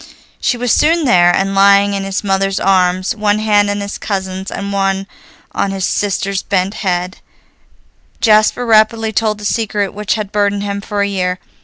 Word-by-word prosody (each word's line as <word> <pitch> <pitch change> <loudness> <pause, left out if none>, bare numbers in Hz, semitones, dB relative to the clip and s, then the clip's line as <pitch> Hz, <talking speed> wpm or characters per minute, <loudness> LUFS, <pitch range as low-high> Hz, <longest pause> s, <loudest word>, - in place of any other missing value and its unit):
She 245 - 0
was 245 -1 0
soon 325 0 +2
there, 175 -8 +4
and, 195 +2 0
lying 200 +1 +4
in 195 -1 -3
his 195 +1 -3
mother's 195 0 0
arms, 185 +2 +1
one 210 -1 +1
hand 210 -1 +2
in 205 0 -2
his 200 0 -6
cousin's, 190 -1 -4
and 200 0 -5
one 195 0 0 0.5
on 200 - -1
his 195 -1 -2
sister's 200 -1 -1
bent 195 0 -1
head, 185 -2 -2 1.0
Jasper 215 +2 +3
rapidly 220 0 +2
told 215 -1 0
the 210 - -9
secret 205 -2 -1
which 210 +1 -2
had 210 -2 -5
burdened 205 -1 0
him 200 0 -4
for 205 -1 -2
a - - 0
year. 185 -2 -2
200 Hz, 175 wpm, -15 LUFS, 195-215 Hz, 1.0 s, there